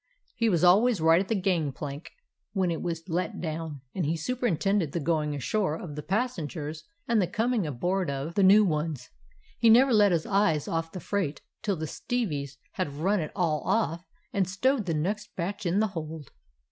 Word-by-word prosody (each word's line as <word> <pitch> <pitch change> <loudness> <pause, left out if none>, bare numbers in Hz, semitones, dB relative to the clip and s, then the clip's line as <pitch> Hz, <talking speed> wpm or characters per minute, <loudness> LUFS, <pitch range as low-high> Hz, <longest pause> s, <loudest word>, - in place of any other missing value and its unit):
He 230 -1 +2
was 175 -4 +1
al 180 +4 +7
ways 240 -5 +2
right 165 +2 +5
at 195 - -4
the 225 - 0
gangplank 150 -5 -2 0.4
when 190 -4 +1
it 165 - -3
was 165 -1 -4
let 175 0 -2
down, 160 -3 -4
and 185 - -2
he 160 +2 0
superintended 200 - 0
the 170 - 0
going 150 -1 0
ashore 155 - 0
of 160 -3 -7
the 150 - -4
passengers 165 - -3 0.2
and 230 -3 +3
the 180 - +1
coming 225 0 0
aboard 175 +6 -1
of 140 +4 -3
the 200 - +2
new 200 +3 +7
ones. 150 -6 -2 0.5
He 230 - +5
never 250 +3 +6
let 205 -2 +5
his 165 -2 +1
eye 195 -6 +2
off 165 0 -2
the 185 - -6
freight 180 -7 -2 0.2
till 205 -4 0
the 160 -1 -4
stevies 150 - -3
had 145 - -3
run 190 +8 +1
it 155 - -3
all 165 -5 +1
off 170 -6 0 0.3
and 190 -3 +1
stowed 225 +3 +1
the 165 - 0
next 205 +7 -2
batch 190 +2 -3
in 180 +4 +2
the 215 0 +2
hold. 160 -5 -7
175 Hz, 195 wpm, -28 LUFS, 155-205 Hz, 0.5 s, al